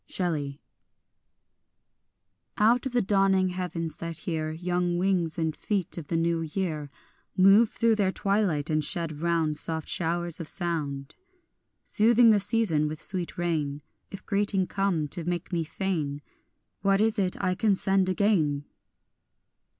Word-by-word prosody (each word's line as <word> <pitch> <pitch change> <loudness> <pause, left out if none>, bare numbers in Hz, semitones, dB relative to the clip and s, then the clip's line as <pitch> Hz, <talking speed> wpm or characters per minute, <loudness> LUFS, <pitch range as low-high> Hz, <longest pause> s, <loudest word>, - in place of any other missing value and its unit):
Shelley. 150 -6 -2 2.0
I 215 +1 +5
OUT 245 +2 +1
of - - -6
the 245 -2 +2
dawning 195 -1 +3
heavens 175 -3 -4
that 165 -1 -6
hear 160 -2 -3
Young 175 +2 -1
wings 180 -3 0
and 160 -2 -1
feet 200 -5 -2
of 160 -4 -6
the 165 - -1
new 165 0 +1
year 155 -3 -3 0.5
Move 195 +4 +6
through 230 -1 +1
their 195 -3 +2
twilight, 190 -8 0
and 155 0 +1
shed 165 -3 -1
round 165 -3 0
Soft 160 -1 -4
showers 170 0 -1
of 165 - -1
sound, 150 -6 -3 0.7
Soothing 230 +1 +5
the 210 - +4
season 195 -7 +1
with 155 0 -5
sweet 180 -3 -2
rain, 150 -5 -2 0.3
If 195 - -10
greeting 200 -2 0
come 185 -6 -1
to 170 +3 -3
make 175 +1 -4
me 170 -1 +1
fain, 155 -4 -3 0.6
What 195 +1 +3
is 220 0 +2
it 185 -2 0
I 185 - +1
can 205 +1 +2
send 190 0 +1
again? 170 -8 +1
175 Hz, 145 wpm, -27 LUFS, 160-195 Hz, 2.0 s, Move